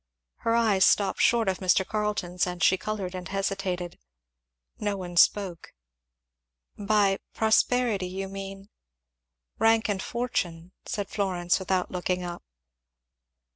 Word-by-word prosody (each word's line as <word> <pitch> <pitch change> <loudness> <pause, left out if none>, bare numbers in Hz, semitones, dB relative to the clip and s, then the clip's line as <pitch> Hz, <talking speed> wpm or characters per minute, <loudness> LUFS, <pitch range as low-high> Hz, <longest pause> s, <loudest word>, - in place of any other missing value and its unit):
Her 230 0 0
eyes 215 -5 +3
stopped 200 -2 +3
short 230 -3 +3
of 190 -1 0
Mr. 185 0 +2
Carleton's 210 -4 -1
and 180 -1 -3
she 190 - +5
coloured 195 -1 -4
and 180 -1 -6
hesitated. 195 -3 -3 0.8
No 205 -1 -1
one 175 -2 -7
spoke. 180 -1 +2 1.0
"By 205 -1 +2 0.2
prosperity 220 -2 +2
you 190 +1 -5
mean 195 +1 -8 0.4
?" - - -60
"Rank 225 0 +3
and 195 -2 -1
fortune," 185 -9 -3 0.2
said 205 -2 -3
Florence, 180 -3 0
without 185 -1 -1
looking 180 0 -2
up. 175 -1 -6
195 Hz, 125 wpm, -27 LUFS, 180-210 Hz, 1.0 s, she